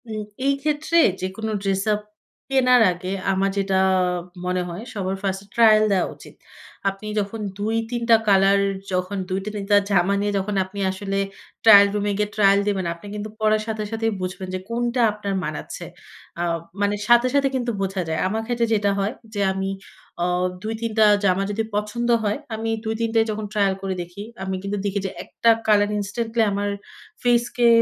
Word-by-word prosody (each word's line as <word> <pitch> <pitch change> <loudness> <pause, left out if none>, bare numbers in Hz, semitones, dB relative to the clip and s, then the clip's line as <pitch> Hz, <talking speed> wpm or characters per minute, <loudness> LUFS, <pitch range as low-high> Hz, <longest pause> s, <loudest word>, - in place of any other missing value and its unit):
উম 215 -1 -3 0.2
এই 280 - +4
ক্ষেত্রে 305 +3 0 0.2
যেকোনো 195 +4 -3
ড্রেস 195 -1 0
আপ 210 - -1 0.5
কেনার 255 -2 +5
আগে, 180 +1 -6 0.2
আমার 195 +1 +1
যেটা 195 -1 0 0.7
মনে 180 0 0
হয়, 175 +4 -6
সবার 195 -3 -2
ফার্স্টে 195 0 -2
ট্রায়াল 220 -2 +6
দেওয়া 190 -2 +2
উচিত। - - -14 0.6
আপনি 195 +2 -8
যখন 205 +2 -3 0.2
২-৩ 225 +3 -2
টা 230 - +9
কালার, 195 0 +5 0.3
যখন 185 +2 -1
২ 190 +1 0
টা - - -2
৩ 200 -1 -4
টা 205 - +7
জামা 195 0 +3
নিয়ে 205 0 0
যখন 200 +1 -2
আপনি 195 +2 -9
আসলে 195 +1 -3 0.5
ট্রায়াল 200 -2 +9
রুমে 205 0 0
গিয়ে 210 0 0
ট্রায়াল 200 -1 +5
দিবেন, 195 -3 0
আপনি 170 +4 -15
কিন্তু 210 +1 -5
পড়ার 215 0 +2
সাথে 220 -1 -2
সাথেই 225 0 0
বুঝবেন 185 +1 -4
যে - - -2
কোনটা 240 +1 0
আপনার 205 -1 -4
মানাচ্ছে। 155 -2 -5 0.5
আ - - -1 0.4
মানে 205 0 +2
সাথে, 240 +1 +6
সাথে 280 -1 +4
কিন্তু 245 -2 -1
বোঝা 195 -1 -1
যায়। 160 - -1
আমার 220 +4 -1
ক্ষেত্রে 240 -1 0
যেটা 205 -2 +2
হয় 200 +3 0 0.2
যে, 205 - -3
আমি 190 0 -2 0.5
অ - - +2 0.4
২-৩ 225 +1 -3
টা 215 - +7 0.2
জামা 190 0 +2
যদি 220 +2 -1
পছন্দ 210 +3 -2
হয়, 210 +2 0 0.2
আমি 225 +1 -3
২-৩ 225 +1 -1
টা - - +6
যখন 215 0 -4
ট্রায়াল 200 -3 +2
করে 195 -1 -2
দেখি, 175 +3 -8 0.2
আমি 190 0 -2
কিন্তু 200 +1 -2
দেখি 200 0 0
যে 190 - -2
একটা 230 - 0 0.2
কালার 205 -1 +4
ইনস্ট্যান্টলি 225 +3 -2
আমার 205 +1 -1 0.5
ফেসকে, 240 0 +2
205 Hz, 180 wpm, -23 LUFS, 195-225 Hz, 0.7 s, টা